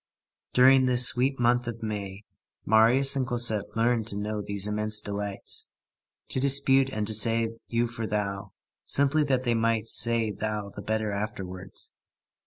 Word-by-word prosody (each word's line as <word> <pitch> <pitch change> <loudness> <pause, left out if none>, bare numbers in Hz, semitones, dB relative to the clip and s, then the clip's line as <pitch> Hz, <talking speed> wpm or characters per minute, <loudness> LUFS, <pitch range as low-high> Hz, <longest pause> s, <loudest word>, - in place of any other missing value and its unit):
During 130 +1 +5
this 125 0 +5
sweet 130 +3 +1
month 120 0 +1
of 115 -1 -6
May, 100 -2 -5 0.4
Marius 120 +6 +4
and 130 -2 -1
Cosette 120 -4 0
learned 115 -1 +1
to 100 - +2
know 105 +1 -3
these 100 -1 -3
immense 105 0 0
delights. 100 -1 -4 0.6
To - - -3
dispute 135 0 +2
and 110 -5 -3
to 110 - -3
say 115 +1 +3 0.2
you 115 0 0
for 115 -1 -5
thou, 100 -2 -4 0.3
simply 140 +2 +2
that 130 -2 0
they 120 -2 0
might 115 -1 0
say 115 -1 +2
thou 105 -1 -4
the 100 - -7
better 110 0 -2
afterwards. 95 -3 -6
110 Hz, 155 wpm, -26 LUFS, 105-125 Hz, 0.6 s, During